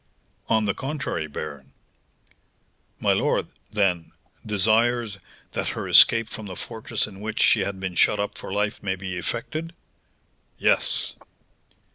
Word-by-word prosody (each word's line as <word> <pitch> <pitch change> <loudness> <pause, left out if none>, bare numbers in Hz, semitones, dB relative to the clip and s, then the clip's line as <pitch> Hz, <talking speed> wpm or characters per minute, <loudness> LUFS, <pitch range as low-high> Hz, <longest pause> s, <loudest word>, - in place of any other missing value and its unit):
"On 110 -1 +3
the 100 - +1
contrary, 135 - -3
baron." 70 -2 -8 1.3
"My - - +3
lord, - - 0 0.2
then, 95 -6 0 0.3
desires 110 +1 +1 0.3
that - - -3
her - - -4
escape 115 -1 +7
from 110 -1 -8
the 95 - -7
fortress 110 +4 -3
in 100 -2 -11
which 110 +1 -4
she 110 - +5
had 95 0 -2
been 95 -1 -4
shut 105 +4 +3
up 100 - -2
for - - -8
life 105 +1 -1
may 95 -1 -1
be 95 -1 -6
effected?" 155 - -4 0.8
"Yes." - - +3
105 Hz, 135 wpm, -24 LUFS, 95-110 Hz, 1.3 s, escape